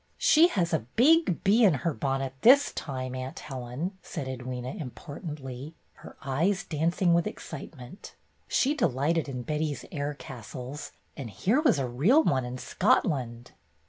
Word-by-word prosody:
"She 340 -9 +6
has 175 - -1
a 145 -8 -1
big 305 - +4
bee 215 +5 +4
in 190 -8 +6
her 165 - +2
bonnet 135 -1 -2
this 280 +4 +6
time. 130 -3 -5
Aunt 130 0 -5
Helen," 135 +8 -5
said 140 - -6
Edwyna, 130 - -5
importantly, 145 0 -7 0.3
her - - -12
eyes 170 +10 0
dancing 170 +3 +1
with 170 0 +2
excitement. 140 - -9 0.3
She 275 +3 +2
delighted 150 - 0
in 125 -2 -5
Betty's 150 +1 -2
air 145 -1 -3
castles, 130 +2 -8 0.2
and 130 -5 -6
here 200 - +1
was 270 - +4
a 135 -2 -1
real 175 - +4
one 130 - +1
in 125 +1 -5
Scotland. 125 -4 0
145 Hz, 145 wpm, -28 LUFS, 130-180 Hz, 0.3 s, She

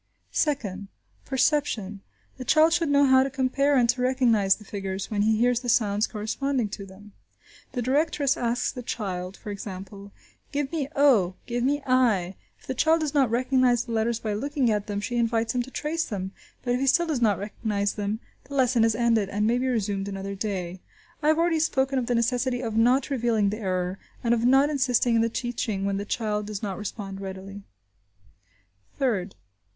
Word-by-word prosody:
Second. 210 -10 -1 0.4
Perception. 255 -8 0 0.4
The - - -4
child 315 +4 +4
should 335 -3 +1
know 285 0 +5
how 260 -1 +6
to 270 - 0
compare 275 +2 +1
and 240 -2 +4
to 250 +1 +1
recognise 235 -6 +3
the 215 - -15
figures, 195 0 -5
when 205 -1 0
he 220 +1 +3
hears 245 +1 +2
the 245 -1 -4
sounds 210 -2 +2
corresponding 230 +2 -2
to 200 -1 -7
them. 200 +2 -14 0.6
The 245 - -2
directress 285 +1 +1
asks 240 +1 -1
the 250 - -7
child, 190 -5 -4
for 210 - -7
example, 200 0 -8 0.4
"Give 285 -1 -2
me 310 -5 -2
o!–Give 240 -3 +2
me 285 +2 +1
i!" 225 -8 +2 0.2
If - - -21
the - - -3
child 320 +5 +3
does 305 -2 -2
not 275 -5 +3
recognise 250 0 +2
the 235 - -7
letters 225 +1 0
by 215 -2 -3
looking 270 +2 0
at 210 0 -1
them, 205 -1 -3
she 240 +3 -3
invites 230 -1 +1
him 250 - +1
to 245 - -7
trace 310 +4 -2
them, 190 -3 -4 0.3
but 245 - 0
if 250 - 0
he 270 - 0
still 345 +6 +4
does 305 -7 -2
not 210 -4 +3
recognise 205 0 -2
them, 210 +2 -3 0.2
the 280 +2 -8
lesson 250 -3 +3
is 225 -1 +3
ended, 230 -4 +2
and 205 +1 0
may 235 +3 +2
be 260 - -1
resumed 205 -5 -1
another 195 0 -5
day. 190 -3 -4 0.4
I 300 - 0
have 310 0 +4
already 335 -1 +2
spoken 270 -3 +1
of 240 - -3
the 245 - +1
necessity 245 +2 0
of 225 -3 -3
not 250 +5 +3
revealing 230 -6 +1
the 215 - -4
error, 185 -2 -2 0.2
and 235 -1 +3
of 235 0 +1
not 270 +4 +5
insisting 250 -4 +2
in 225 - +4
the 230 - +1
teaching 230 -4 -3
when 200 0 0
the 200 - -4
child 210 -1 -2
does 210 0 -5
not 195 -2 -3
respond 195 -1 -6
readily. 195 +1 -7 1.4
Third. 210 -8 -1
235 Hz, 195 wpm, -26 LUFS, 205-260 Hz, 1.4 s, how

